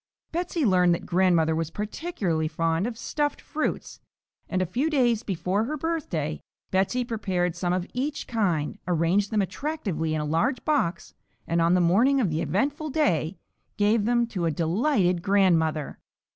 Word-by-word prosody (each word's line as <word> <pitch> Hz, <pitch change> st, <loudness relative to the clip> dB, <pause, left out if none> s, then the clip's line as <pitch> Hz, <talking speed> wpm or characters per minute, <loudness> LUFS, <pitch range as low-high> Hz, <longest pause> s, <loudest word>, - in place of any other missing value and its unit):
Betsey 340 Hz, -2 st, -1 dB
learned 180 Hz, -4 st, +4 dB
that -, -, -8 dB
grandmother 170 Hz, -3 st, +3 dB
was 165 Hz, -1 st, -2 dB
particularly 205 Hz, -, -2 dB
fond 165 Hz, +4 st, 0 dB
of 235 Hz, -2 st, -5 dB
"Stuffed 295 Hz, +4 st, -2 dB
Fruits," 310 Hz, -, -3 dB, 0.5 s
and 185 Hz, -, 0 dB
a 185 Hz, -, +1 dB
few 250 Hz, -, -1 dB
days 245 Hz, -7 st, +2 dB
before 195 Hz, 0 st, -1 dB
her 305 Hz, +5 st, -3 dB
birthday 270 Hz, -, -2 dB, 0.3 s
Betsey 195 Hz, +7 st, +1 dB
prepared 190 Hz, -7 st, -1 dB
some 175 Hz, -1 st, -1 dB
of 180 Hz, 0 st, 0 dB
each 285 Hz, +4 st, -2 dB
kind, 195 Hz, -6 st, -1 dB
arranged 180 Hz, +4 st, +2 dB
them 210 Hz, -2 st, +1 dB
attractively 190 Hz, -, -3 dB
in 155 Hz, -, -1 dB
a -, -, -2 dB
large 170 Hz, -, 0 dB
box, 185 Hz, -, 0 dB, 0.3 s
and 170 Hz, 0 st, +1 dB
on 170 Hz, +2 st, +4 dB
the 180 Hz, -, +3 dB
morning 230 Hz, +11 st, +4 dB
of 205 Hz, -10 st, +1 dB
the 155 Hz, -, -1 dB
eventful 290 Hz, -, -1 dB
day 180 Hz, -, 0 dB, 0.4 s
gave 205 Hz, +1 st, +2 dB
them 240 Hz, 0 st, +2 dB
to 190 Hz, -7 st, -3 dB
a -, -, +2 dB
delighted 180 Hz, -, +1 dB
grandmother. 170 Hz, -6 st, +2 dB
190 Hz, 160 wpm, -26 LUFS, 170-245 Hz, 0.5 s, learned